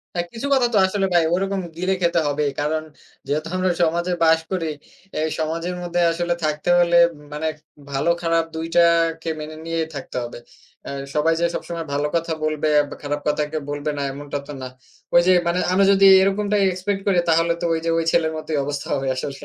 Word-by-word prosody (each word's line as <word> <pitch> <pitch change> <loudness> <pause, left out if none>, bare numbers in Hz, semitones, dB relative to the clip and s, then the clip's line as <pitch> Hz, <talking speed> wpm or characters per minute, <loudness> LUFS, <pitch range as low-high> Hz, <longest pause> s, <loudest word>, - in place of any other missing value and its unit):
হ্যাঁ, 175 0 -1
কিছু 235 +4 -5
কথা 250 -2 +3
তো - - +5
আসলে 195 0 0
ভাই 170 -2 +5
ওরকম 195 +1 -1 0.2
গিলে 185 +2 0
খেতে 170 0 +2
হবেই। 145 0 0
কারণ 155 +1 -1 0.4
যেহেতু 155 +3 -2
আমরা 185 0 +1
সমাজে 170 +2 +1
বাস 160 0 +5
করি, 175 -4 -1 0.5
এই 160 - 0
সমাজের 165 +3 -2
মধ্যে 175 0 -1
আসলে 175 +1 -1
থাকতে 150 +2 -2
হলে 170 0 +4 0.4
মানে 155 +2 -3 0.4
ভালো 140 +5 0
খারাপ 165 0 +2
২ 160 +1 -3
টাকে 165 -1 +3
মেনে 155 +1 -7
নিয়েই 165 -1 -1
থাকতে 135 -2 -7
হবে। 120 - -8 0.5
আ - - -5 0.2
সবাই 155 +2 +2
যে, - - +2
সবসময় 170 -1 -4
ভালো 145 +1 0
কথা 165 -1 0
বলবে 155 0 0 0.2
বা - - -8
খারাপ 145 0 -2
কথা 150 0 +1
কেউ 155 -2 -3
বলবে 145 +1 -2
না - - -2
এমনটা 145 +1 -5
তো 145 - -7
না। - - -4 0.5
ঐ - - +6
যে, 185 - +6
মানে 170 +1 +1
আমরা 195 +1 +4
যদি 195 0 +4 0.2
এরকমটাই 200 +1 +1
expect 195 +2 -2
করি 190 -3 +3
তাহলে 165 +1 +3
তো - - -3
ঐ - - +2
যে, 165 - +1
ঐ - - +2
ছেলের 160 -2 +2
মতোই 155 -1 -3
অবস্থা 145 0 -4
হবে 135 0 -2
আসলে। 135 +1 -5
165 Hz, 200 wpm, -22 LUFS, 150-175 Hz, 0.5 s, ঐ